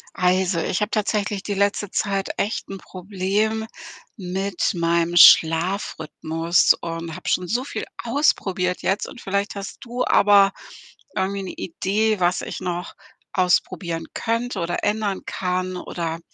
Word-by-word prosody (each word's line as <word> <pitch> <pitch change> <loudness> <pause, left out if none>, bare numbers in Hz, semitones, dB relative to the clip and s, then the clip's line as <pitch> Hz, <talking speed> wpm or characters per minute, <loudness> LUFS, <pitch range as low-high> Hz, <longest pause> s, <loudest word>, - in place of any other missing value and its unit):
Also, 180 -1 +2
ich 180 - -1
habe 210 - 0
tatsächlich 205 -1 -1
die 205 - -2
letzte 200 0 0
Zeit 195 -1 -1
echt 215 - -2
'n 195 - -5
Problem 200 +4 -2 0.5
mit 190 0 -2
meinem 170 0 +1
Schlafrhythmus 165 -1 +4
und 165 -1 -5
habe 185 - -5
schon 180 - +1
so 240 +7 0
viel 285 - -5 0.2
ausprobiert 195 -9 +1
jetzt 195 +2 0
und - - -11
vielleicht 200 +1 -2
hast 200 -1 -6
du 245 +1 -2
aber 200 -1 +5 0.6
irgendwie 195 +1 -1
'ne 190 - -5
Idee, 210 +4 -1
was 180 0 +2
ich - - -6
noch 175 0 -4 0.4
ausprobieren 180 -2 0
könnte 230 -1 -2
oder 170 0 -2
ändern 210 -2 0
kann 185 0 -2
oder 165 -2 -4
190 Hz, 135 wpm, -22 LUFS, 175-205 Hz, 0.6 s, aber